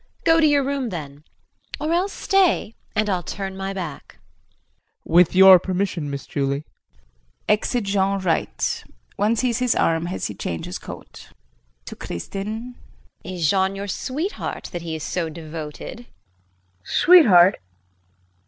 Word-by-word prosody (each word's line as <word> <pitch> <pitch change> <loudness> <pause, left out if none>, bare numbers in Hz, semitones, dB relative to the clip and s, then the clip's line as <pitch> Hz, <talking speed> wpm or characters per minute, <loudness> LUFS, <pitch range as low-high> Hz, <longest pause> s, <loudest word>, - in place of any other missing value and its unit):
Go 330 0 +5
to 315 - +5
your 290 -1 +3
room 275 -2 -2
then 150 -5 -8 0.5
or 310 +2 -1
else 370 +4 +1
stay 380 - +1 0.2
and 215 0 +1
I'll 185 -3 0
turn 195 +2 -5
my 195 0 -4
back. 175 -7 -7
JEAN. - - -31 0.9
With 175 0 +5
your 190 -1 +9
permission, 185 -4 -2
Miss 140 -1 -5
Julie. 140 +1 -2 0.8
[Exit 210 +3 +1
Jean 195 0 +1
R. 165 - +2 0.7
One 210 +3 +2
sees 240 0 0
his 250 -2 +1
arm 165 +1 +1
as 180 - -4
he - - -3
changes 85 -4 -5
coat.] - - -11
JULIE - - -21 0.6
[To - - -8
Kristin]. 215 - -6 0.5
Is 175 -3 -2
Jean 190 +3 +2
your 200 +1 -5
sweetheart, 295 - -4
that 175 - -5
he 165 -1 -5
is 155 - -6
so 170 -3 -2
devoted? 155 0 -8 0.8
KRISTIN. 90 - -41
Sweetheart? 205 - +6
190 Hz, 145 wpm, -22 LUFS, 165-235 Hz, 0.9 s, your